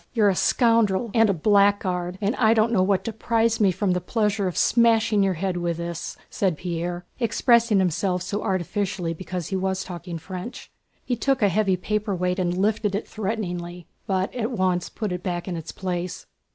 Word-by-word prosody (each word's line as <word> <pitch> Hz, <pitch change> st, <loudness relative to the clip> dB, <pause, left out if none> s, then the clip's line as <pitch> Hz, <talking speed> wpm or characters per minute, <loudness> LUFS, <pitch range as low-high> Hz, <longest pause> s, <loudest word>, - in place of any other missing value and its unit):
"You're 215 Hz, -4 st, +4 dB
a 190 Hz, -, +1 dB
scoundrel 230 Hz, -1 st, +2 dB
and 225 Hz, -2 st, +4 dB
a -, -, +5 dB
blackguard, 190 Hz, -1 st, +2 dB
and 205 Hz, +5 st, 0 dB
I 225 Hz, -1 st, +4 dB
don't 220 Hz, +1 st, +3 dB
know 205 Hz, -5 st, +3 dB
what 190 Hz, 0 st, +2 dB
deprives 230 Hz, 0 st, 0 dB
me 195 Hz, -2 st, +5 dB
from 190 Hz, +1 st, 0 dB
the 180 Hz, 0 st, 0 dB
pleasure 210 Hz, 0 st, 0 dB
of 180 Hz, -, -4 dB
smashing 225 Hz, -3 st, +3 dB
your 195 Hz, -2 st, +2 dB
head 185 Hz, +1 st, -2 dB
with 170 Hz, -1 st, -1 dB
this!" 170 Hz, -1 st, -5 dB
said 185 Hz, -6 st, -1 dB
Pierre, 175 Hz, 0 st, -4 dB
expressing 235 Hz, -1 st, +3 dB
himself 180 Hz, 0 st, 0 dB
so 205 Hz, +3 st, -3 dB
artificially 185 Hz, -2 st, -2 dB
because 180 Hz, 0 st, -5 dB
he 195 Hz, -, -2 dB
was 190 Hz, 0 st, -1 dB
talking 175 Hz, -1 st, -7 dB
French. 185 Hz, +8 st, -8 dB, 0.3 s
He 245 Hz, -, 0 dB
took 270 Hz, 0 st, 0 dB
a 200 Hz, -, +5 dB
heavy 195 Hz, -1 st, +1 dB
paperweight 190 Hz, -2 st, -1 dB
and 180 Hz, -1 st, 0 dB
lifted 210 Hz, +1 st, +1 dB
it 205 Hz, -, -3 dB
threateningly, 180 Hz, -5 st, -4 dB, 0.2 s
but 190 Hz, -1 st, 0 dB
at 235 Hz, -2 st, -2 dB
once 185 Hz, -6 st, 0 dB
put 215 Hz, -4 st, -4 dB
it 180 Hz, -1 st, -3 dB
back 175 Hz, -1 st, -3 dB
in 180 Hz, -, -3 dB
its 165 Hz, -1 st, -6 dB
place. 180 Hz, -1 st, -4 dB
190 Hz, 185 wpm, -24 LUFS, 180-215 Hz, 0.3 s, a